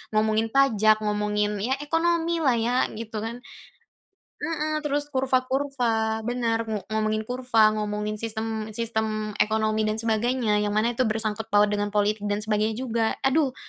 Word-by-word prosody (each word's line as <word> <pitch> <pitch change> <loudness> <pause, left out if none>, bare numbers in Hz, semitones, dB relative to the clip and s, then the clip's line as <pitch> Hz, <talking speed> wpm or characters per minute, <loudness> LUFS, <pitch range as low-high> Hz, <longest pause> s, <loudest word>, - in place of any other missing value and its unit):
ngomongin 220 +1 +2
pajak, 215 -6 +4
ngomongin, 210 0 0
ya 245 +6 0
ekonomi 335 +2 +1
lah 270 -6 +3
ya 235 +2 0 0.2
gitu 220 0 -6
kan. 230 +3 -5 0.9
Mhm, 310 -2 -2
terus 290 0 -1
kurva-kurva, 255 -4 0
benar. 230 -2 -1
Ngu 215 -2 -3
ngomongin 215 0 0
kurva, 235 -3 +3
ngomongin 210 0 -3
sistem 220 -1 -3
sistem 220 -2 -2
ekonomi 215 0 +1
dan 215 - 0
sebagainya, 225 0 +1
yang 205 0 -1
mana 230 +3 +2
itu 240 0 0
bersangkut 220 0 -2
paut 205 -1 +3
dengan 205 0 0
politik 210 +1 +2
dan 205 +1 -1
sebagainya 215 0 0
juga. 230 -2 0
Aduh, 270 -1 +2
220 Hz, 145 wpm, -25 LUFS, 215-250 Hz, 0.9 s, pajak